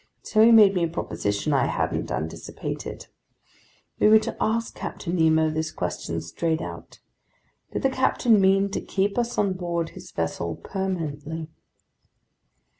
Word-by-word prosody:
So 215 - +2
he 230 - +7
made 210 -4 +8
me 180 -3 +1
a - - -1
proposition 105 -5 -2
I 140 - +3
hadn't - - -1
anticipated. 80 +1 -5 0.9
We - - +5
were 215 +1 +8
to 215 - -2
ask 230 +1 0
Captain 175 0 -5
Nemo 160 -1 +3
this 155 0 -2
question 80 0 -3
straight 160 - -1
out: - - -8 0.7
did - - -3
the 270 - +4
captain 245 -4 +3
mean 195 +1 +3
to - - -2
keep 200 +1 -1
us 240 0 -2
on 200 -2 +2
board 170 -2 -2
his - - -12
vessel 85 +1 -3
permanently? 160 -5 -4
175 Hz, 145 wpm, -25 LUFS, 155-205 Hz, 0.9 s, made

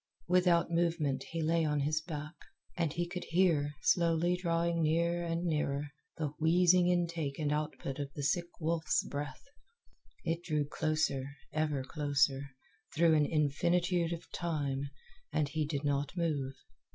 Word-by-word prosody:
Without 175 -1 +3
movement 165 -5 0
he 165 -1 -2
lay 165 +1 +2
on 150 -2 +1
his 155 +2 +1
back, 150 -1 -6 0.4
and 170 -4 0
he 175 +2 -2
could 180 +1 -5
hear, 165 -5 +2
slowly 170 +1 +3
drawing 170 -1 0
near 170 +2 +1
and 170 0 -2
nearer, 150 -3 -1 0.3
the 155 -2 -1
wheezing 175 +2 +5
intake 170 -5 0
and 150 -2 -1
output 150 -2 -3
of 140 -1 -4
the 145 - -4
sick 170 +4 +1
wolf's 160 -1 +1
breath. 145 -2 -5 0.8
It 165 0 -1
drew 150 -4 0
closer, 145 -3 -1 0.2
ever 150 -3 0
closer, 140 -1 +1 0.5
through 165 0 +5
an 150 -2 +4
infinitude 170 +3 +1
of 170 -1 -5
time, 145 -5 -2 0.4
and 150 -2 0
he 155 0 -1
did 145 -2 -2
not 145 +3 -1
move. 145 -6 -1
160 Hz, 145 wpm, -32 LUFS, 145-170 Hz, 0.8 s, wheezing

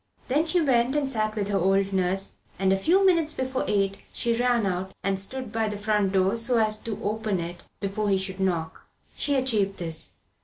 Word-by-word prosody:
Then 300 +6 +2
she 350 +3 +2
went 260 -3 +2
and 280 -2 0
sat 215 -3 -1
with 205 -2 -2
the 200 -1 +1
old 195 +2 +2
nurse, 190 +1 +1 0.2
and 190 0 +2
a - - +4
few 355 - +3
minutes 335 -5 +3
before 260 0 -2
eight 195 -1 +1
she 235 -1 0
ran 240 -2 +2
out 190 0 -3
and 195 -1 +1
stood 255 +4 -3
by 225 0 0
the 210 -1 -4
front 205 -2 +1
door 190 +3 +2
so 235 +1 +1
as 215 -1 +2
to 220 -1 -6
open 215 -2 -1
it 170 +1 -5 0.2
before 200 +1 -2
he 195 - +3
should 190 0 -3
knock. 170 -4 -2 0.2
She 285 - +2
achieved 215 -7 +1
this. 165 -2 -1
210 Hz, 205 wpm, -26 LUFS, 195-245 Hz, 0.2 s, a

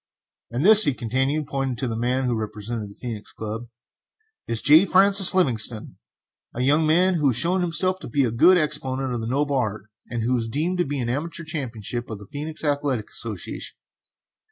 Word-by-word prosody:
] - - -69
"And 125 +7 -2
this," 215 +1 +8
he 140 - +1
continued, 130 +6 -1
pointing 135 -3 -2
to 130 +2 -2
the 115 - -3
man 125 +3 0
who 125 -2 0
represented 110 0 -5
the 100 - -14
Phœnix 115 -4 -7
Club, 110 +2 -5 0.8
"is 115 -1 -2
J. 155 +4 +7
Francis 195 0 +5
Livingstone, 115 - 0 0.6
a 120 - -3
young 150 +4 +3
man 180 +4 +3
who 150 -5 +1
has 130 - +2
shown 180 +9 +2
himself 185 +2 +1
to - - -9
be 140 +4 +1
a 120 - 0
good 180 +11 +5
exponent 135 -4 -1
of 120 - -3
the 110 - -4
noble 140 +3 0
art, 110 -5 -2 0.3
and 120 -2 -3
who 125 +3 +1
is 115 -2 -2
deemed 160 +10 -2
to 175 - +2
be 140 -2 -3
the 120 - -2
amateur 165 +6 -4
champion 135 -9 -6 0.3
of 110 - -5
the 100 - -12
Phœnix 155 +2 -5
Athletic 145 -6 -1
Association. 110 -6 -5
135 Hz, 200 wpm, -23 LUFS, 115-155 Hz, 0.8 s, this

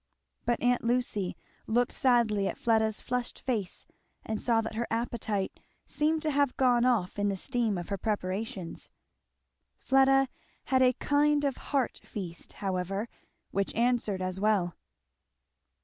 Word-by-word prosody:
But 240 - +1
aunt 245 0 +3
Lucy 230 -6 0 0.3
looked 240 +2 +2
sadly 230 -6 +2
at - - -3
Fleda's 220 -2 +2
flushed 250 -1 -3
face 220 -8 -3 0.4
and 220 -1 -3
saw 230 -2 +3
that 225 - -5
her 235 +2 -2
appetite 225 -4 -2 0.3
seemed 310 +1 0
to 310 - +1
have 280 -2 +1
gone 245 -2 +4
off 210 -6 +1
in 205 0 +2
the 195 - -2
steam 235 -3 0
of 175 - -6
her 200 - -2
preparations. 195 -3 -3 0.9
Fleda 270 0 +4 0.4
had 260 -1 +2
a 255 0 +5
kind 290 +2 +2
of 275 -2 0
heart 270 -5 0
feast 175 -5 -7
however 195 +3 -2 0.4
which 200 0 -1
answered 230 -5 +1
as 185 0 -3
well. 195 -5 +2
230 Hz, 140 wpm, -29 LUFS, 200-250 Hz, 0.9 s, a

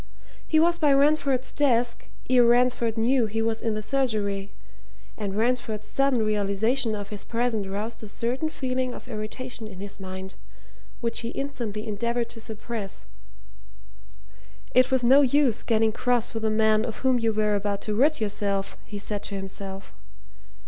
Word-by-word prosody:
He 315 - +4
was 340 +1 +3
by 295 -3 +4
Ransford's 275 -2 +3
desk 245 -4 +1 0.2
ere 250 -1 +5
Ransford 240 -1 +3
knew 235 +1 +3
he 220 +1 -3
was 225 0 0
in 225 -2 -1
the 215 - -3
surgery 205 -7 0 0.6
and 205 -2 -4
Ransford's 225 -2 0
sudden 275 -5 +2
realization 215 +3 +1
of 205 -1 -6
his 205 -2 -6
presence 230 -4 -1
roused 210 +4 -4
a 215 - -8
certain 250 +8 -2
feeling 255 -3 -2
of - - -11
irritation 225 +1 -6
in 190 -3 -10
his 200 +1 -6
mind, 190 0 -7 0.7
which 230 -1 -1
he 230 - -4
instantly 235 -6 -4
endeavoured 235 +3 -1
to 225 - -9
suppress 215 - -6 1.7
it 255 0 +5
was 260 -2 +2
no 265 +4 +7
use 275 -3 +3
getting 225 -1 +2
cross 245 +1 +1
with 225 -1 -3
a - - +3
man 215 0 +3
of 225 -2 -4
whom 255 -2 +4
you 225 -1 +1
were 215 -1 +1
about 200 0 -1
to 215 - -2
rid 290 +8 +3
yourself, 200 -2 -1
he 205 - -8
said 205 0 -2
to 200 - -5
himself. 195 - -6
225 Hz, 165 wpm, -26 LUFS, 210-250 Hz, 1.7 s, no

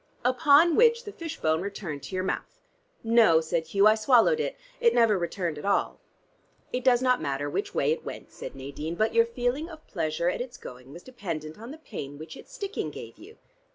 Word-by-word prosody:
"Upon 290 +5 +5
which 470 0 +4
the 415 - -7
fish 330 -4 -7
bone 160 +1 +1
returned 185 -7 -5
to 140 +8 -7
your 185 - -1
mouth?" - - -4 0.4
"No," 225 -8 +5
said 160 0 -2
Hugh. 195 +5 +3
"I 215 - +8
swallowed 245 - +4
it. - - -2 0.2
It 475 -1 +3
never 230 -3 +5
returned 170 -3 -3
at - - -9
all." 200 - 0 0.7
"It 250 - -2
does 250 -1 +4
not 255 -1 +3
matter 140 +1 -2
which - - -3
way 140 - +2
it 160 - -2
went," - - -8
said - - -8
Nadine; 140 +5 -6
"but 220 +4 +1
your 230 0 +4
feeling 245 +7 -2
of 315 -2 -12
pleasure 165 -2 -2
at 180 - 0
its 245 0 -7
going 125 +1 -11
was 170 +4 -11
dependent 165 -10 -6
on 230 +2 -9
the 300 - -8
pain 145 - -8
which 155 +1 -9
its - - -14
sticking 415 -5 -4
gave - - -10
you." 445 - -14
215 Hz, 210 wpm, -27 LUFS, 160-260 Hz, 0.7 s, I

